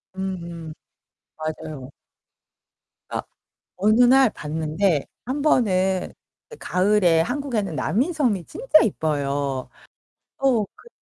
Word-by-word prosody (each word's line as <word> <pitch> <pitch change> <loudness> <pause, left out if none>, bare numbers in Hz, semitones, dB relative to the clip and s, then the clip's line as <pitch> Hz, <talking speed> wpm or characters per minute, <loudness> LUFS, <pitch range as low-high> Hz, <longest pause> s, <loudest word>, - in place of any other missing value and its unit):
음. 170 -4 -5 0.6
맞아요. 155 -3 -6 1.2
아. - - -2 0.6
어느 215 +5 +4
날 260 0 +6
봤는데 155 +1 -1 0.2
1 270 +4 -2
번은 190 -10 +2 0.5
가을에 180 -3 +3
한국에는 215 - -2
남이섬이 245 - 0
진짜 465 -9 +3
이뻐요. 140 - -1 0.7
어 255 -6 +2
그 - - -17
190 Hz, 170 characters per minute, -23 LUFS, 160-240 Hz, 1.2 s, 날